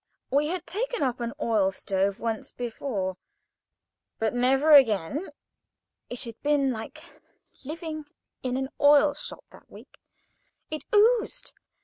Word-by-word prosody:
We 285 +2 +3
had 355 +1 -3
taken 485 +1 -2
up 255 -2 -1
an 235 -1 -2
oil 215 -7 +2
stove 195 +1 -1
once, 225 -2 -3 1.7
but 220 -1 0
"never 265 +5 +3
again." 270 - +5 0.8
It 245 - -5
had 230 -2 -9
been 290 -2 +2
like 225 -2 -7 0.6
living 310 +1 -6 0.4
in 255 0 -2
an 265 0 -2
oil 290 0 +6
shop 295 - -9
that - - -17
week. - - -15 0.7
It 310 - -5
oozed. 440 +2 +3
270 Hz, 120 wpm, -27 LUFS, 230-310 Hz, 1.7 s, oil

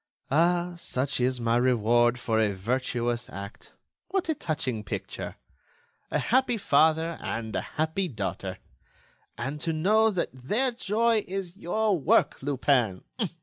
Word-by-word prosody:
"Ah! 175 +3 +2
Such 135 -5 -1
is 125 0 +1
my 115 0 +1
reward 120 -1 +3
for 115 -2 0
a 105 -3 +2
virtuous 120 +2 -1
act! 100 +1 -9 0.3
What 370 -2 -1
a - - +3
touching 145 - -2
picture! - - -5 0.7
A - - 0
happy 250 -1 +2
father 160 -1 +3
and 110 -1 -4
a - - 0 0.2
happy 160 +5 0
daughter! 100 - -4 0.8
And 140 +5 -4
to 165 -1 0
know 215 +8 +4
that 185 -5 -1
their 210 - 0
joy 230 -1 +1
is 190 -2 -4
your 205 0 0
work, - - +3
Lupin! 130 -7 +1
145 Hz, 135 wpm, -27 LUFS, 120-190 Hz, 0.8 s, know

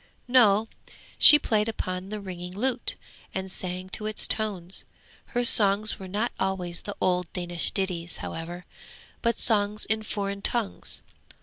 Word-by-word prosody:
No, 225 -4 +5 0.5
she 295 - +10
played 215 -6 +1
upon 185 -3 -4
the 215 0 -4
ringing 180 -2 -7
lute, 245 +3 -1 0.4
and 190 0 -3
sang 185 0 -5
to 215 +3 -3
its 215 - +1
tones. 195 -5 0 0.4
Her 245 -1 -1
songs 210 -2 +4
were 190 - -7
not 210 +6 -1
always 180 -3 -2
the 205 - -6
old 180 -2 +1
Danish 175 -2 -1
ditties, 180 -4 -1
however, 170 +2 -6 0.6
but 235 0 +1
songs 210 -2 +1
in 220 0 +1
foreign 200 -2 -3
tongues. 230 -1 -2
200 Hz, 140 wpm, -27 LUFS, 180-215 Hz, 0.6 s, she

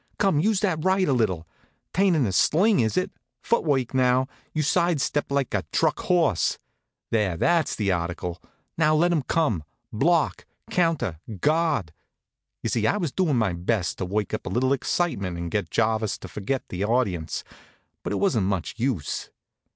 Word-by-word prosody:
Come, 195 -7 +2
use 205 +4 +2
that 170 -7 0
right 190 0 +3
a 140 - +3
little. 95 -9 0 0.5
'Tain't 190 -1 +3
in 145 -5 +2
a 100 - 0
sling, 180 - +3
is 110 +4 +1
it? 185 - 0 0.3
Foot 235 - +2
work, 135 -6 0
now. 130 0 +3 0.2
You 155 - -1
side 170 +1 +2
step 145 +2 -1
like 140 -2 0
a - - 0
truck - - +1
horse. 165 - +2 0.5
There, 105 -6 +1
that's 170 - +2
the 100 -3 0
article. 85 0 -3 0.4
Now 155 -1 +4
let 175 +3 +3
'em 165 -4 +2
come 130 - 0 0.3
block, 160 +9 +1 0.2
counter, 165 - +1 0.2
guard!" 155 - +1 0.7
You - - 0
see, 110 -2 +1
I 205 - +2
was 170 -8 -2
doin' 160 -7 +1
my 110 -6 +1
best 90 +1 -1
to 95 - -1
work 100 +2 -2
up - - -3
a - - -1
little 130 +3 +2
excitement 110 - -1
and 85 -1 -4
get 100 -6 -1
Jarvis 110 0 0
to - - -9
forget 105 +8 -3
the 90 +2 -3
audience; 100 - 0 0.6
but - - -4
it - - 0
wasn't 120 - +1
much 95 -4 -2
use. 115 - -2
130 Hz, 175 wpm, -25 LUFS, -, 0.7 s, Now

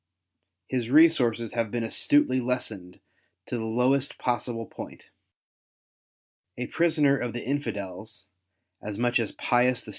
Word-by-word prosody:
His 125 -3 -2
resources 130 -7 +4
have 115 -2 -1
been 120 +1 -2
astutely 130 +3 +2
lessened 110 -7 -3 0.5
to - - -4
the 110 -2 -3
lowest 125 +5 +1
possible 120 -2 -2
point. - - -11 1.5
A 125 - -3
prisoner 155 -2 +2
of 120 -3 -3
the 120 - -5
Infidels, 110 -7 -4 0.6
as 105 -1 -6
much 120 +1 +2
as 115 - -2
Pius 125 0 +1
VI. - - -12
120 Hz, 125 wpm, -26 LUFS, 110-130 Hz, 1.5 s, resources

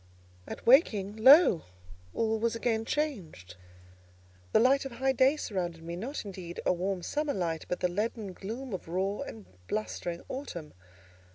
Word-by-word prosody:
At - - -8
waking, 215 - +4
lo! 265 - +7 0.5
all 225 -1 0
was 230 +1 0
again 225 -1 0
changed. 190 - -3 1.0
The - - +5
light 265 +4 +4
of 270 -3 -7
high 265 +2 +1
day 265 +3 +3
surrounded 175 - -4
me; 170 +1 -5
not, 235 +8 -5
indeed, 180 -3 -7
a - - +4
warm, 185 0 -2
summer 295 - -1
light, 165 -4 -2
but 180 - -2
the 180 - +3
leaden 210 +2 -3
gloom 230 +6 -6
of 185 - -5
raw 190 +4 -1
and 110 -3 -7 0.2
blustering 175 -5 -3
autumn. 175 - -6
210 Hz, 155 wpm, -30 LUFS, 175-260 Hz, 1.0 s, lo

